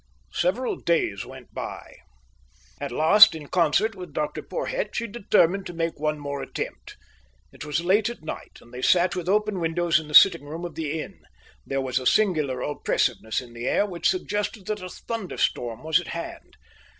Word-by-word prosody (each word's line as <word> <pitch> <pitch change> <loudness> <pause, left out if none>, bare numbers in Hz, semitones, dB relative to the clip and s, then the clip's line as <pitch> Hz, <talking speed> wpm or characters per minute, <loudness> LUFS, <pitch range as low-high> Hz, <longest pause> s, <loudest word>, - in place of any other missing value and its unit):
Several 195 +9 0
days 160 -12 0
went - - -12
by. - - -7 0.8
At - - -4
last, 165 - +7
in 155 -2 -8
concert 175 +7 +2
with 180 -5 -10
Dr 150 0 -2
Porhoët, - - -3
she 235 - -1
determined 200 -4 +2
to 175 - -8
make 165 -2 -2
one 155 0 0
more 140 -1 -5
attempt. - - -6 0.5
It - - -10
was 150 +3 -2
late 200 +4 +3
at 235 -9 -9
night, 155 - -7
and 120 - -18
they 125 - -6
sat 175 +5 +3
with 180 0 -3
open 210 -1 +1
windows 170 0 +2
in 155 - -9
the 150 - -3
sitting 170 -6 +8
room 160 +4 -6
of 170 - -6
the 160 0 -3
inn. - - -8 0.5
There 135 0 -1
was 130 -1 0
a 130 - -1
singular 155 -11 +2
oppressiveness 125 -5 -1
in 120 -2 -13
the 120 +1 -5
air - - +2
which 180 -4 0
suggested 210 - -2
that 210 0 -3
a 185 - -6
thunderstorm 170 - -3
was 160 +1 +3
at 175 - -8
hand. 170 - -7
170 Hz, 185 wpm, -25 LUFS, 150-195 Hz, 0.8 s, sitting